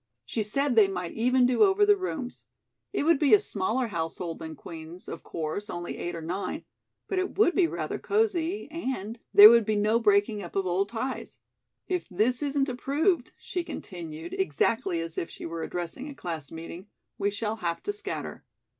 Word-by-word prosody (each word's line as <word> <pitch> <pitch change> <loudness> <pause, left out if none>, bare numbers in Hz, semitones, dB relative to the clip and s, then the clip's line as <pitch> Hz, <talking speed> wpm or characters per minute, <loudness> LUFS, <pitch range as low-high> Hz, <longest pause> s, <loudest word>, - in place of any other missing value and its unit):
She 225 - -2
said 260 +5 0
they 215 -3 +7
might 180 -3 -4
even 250 +2 +3
do 250 0 +2
over 410 0 +6
the 415 0 +6
rooms. 315 -10 -5 0.5
It 400 - 0
would 325 -2 +4
be 295 +5 +7
a - - +3
smaller 230 - -1
household 165 -1 -4
than 160 -1 -7
Queen's, 165 +3 -9
of - - -6
course 165 +6 -4
only 175 0 -5
eight 175 0 -3
or 165 - -6
nine 175 +5 -4 0.4
but 385 - 0
it 375 +1 -3
would 380 -4 +5
be 365 -3 +4
rather - - -3
cosy 405 -3 0
and 250 - -4
there 205 +1 +12
would 235 -1 +6
be 215 +1 0
no 215 +2 +3
breaking 205 -1 +3
up 175 - -9
of 195 -1 +1
old 185 +3 0
ties. 250 +4 -4 0.5
If 365 -2 -2
this 220 +8 +1
isn't 285 -1 +1
approved," 280 +5 0
she 355 - -4
continued, 170 - -7
exactly 180 +1 0
as 165 0 -4
if 165 - -4
she - - -9
were 165 0 -4
addressing 175 - -4
a 285 - -9
class 160 - -6
meeting, 165 +4 -8 0.3
"we 200 0 +2
shall 210 +2 -3
have 170 -4 -3
to 410 - -2
scatter. 410 -1 -6
215 Hz, 190 wpm, -28 LUFS, 175-290 Hz, 0.5 s, there